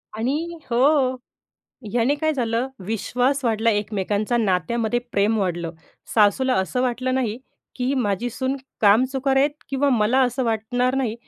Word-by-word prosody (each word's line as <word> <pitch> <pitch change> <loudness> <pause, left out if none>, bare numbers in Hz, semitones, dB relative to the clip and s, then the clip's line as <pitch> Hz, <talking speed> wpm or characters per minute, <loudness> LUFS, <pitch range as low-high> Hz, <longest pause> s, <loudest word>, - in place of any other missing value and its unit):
आणि 300 +10 -2
हो, 240 +2 +3 1.1
ह्याने 245 +4 +2
काय 315 +1 0
झालं, 240 -1 -1 0.2
विश्वास 250 +5 0
वाढला 225 0 +2
एकमेकांचा 205 +2 -1
नात्यामध्ये 220 +3 0
प्रेम 210 +2 +2
वाढलं. 175 -4 -2 0.4
सासूला 230 +5 +3
असं 190 +7 -1
वाटलं 255 +1 -1
नाही, 240 -4 -1 0.4
की 255 +1 -1
माझी 225 -1 -1
सून 260 +3 -2 0.2
कामचुकार 260 +6 +3
आहेत. 280 +2 +4 0.2
किंवा 280 +1 +1
मला 235 +1 +2
असं 250 +1 0
वाटणार 240 +3 0
नाही, 255 -5 -1
240 Hz, 135 wpm, -22 LUFS, 215-260 Hz, 1.1 s, आहेत